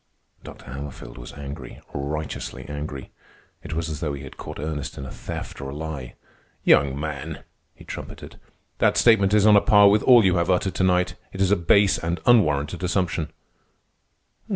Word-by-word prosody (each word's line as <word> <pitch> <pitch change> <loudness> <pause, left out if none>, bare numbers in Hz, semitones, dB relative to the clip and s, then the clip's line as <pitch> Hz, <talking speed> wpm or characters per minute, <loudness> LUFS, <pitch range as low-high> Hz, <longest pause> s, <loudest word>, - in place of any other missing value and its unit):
Dr. - - -12
Hammerfield 65 -2 -8
was - - -10
angry, 70 -1 -8
righteously 75 +2 -5
angry. 75 -1 -6 0.5
It - - -7
was 85 0 -2
as 75 -2 -5
though 75 -4 -2
he 70 0 -7
had 65 - -10
caught - - -8
Ernest 75 -2 -4
in 70 - -6
a 65 - -8
theft - - -7
or 70 - -5
a 70 - -7
lie. 75 -5 -6 0.5
"Young 70 0 +4
man," 75 -3 -5 0.3
he - - -15
trumpeted, - - -9 0.4
"that - - +3
statement 105 -5 +5
is 105 -1 +4
on 105 -1 +7
a 100 - +6
par 105 -1 +6
with 105 +1 +3
all 120 -5 +6
you 90 -1 +3
have 85 +1 0
uttered 90 0 +1
to 90 - -1
night. 90 -1 +2 0.2
It 95 - -9
is 95 0 +2
a - - +6
base 100 +3 +3
and 85 +1 -2
unwarranted 85 -7 +3
assumption." 90 -4 -1
80 Hz, 180 wpm, -24 LUFS, 70-95 Hz, 0.5 s, on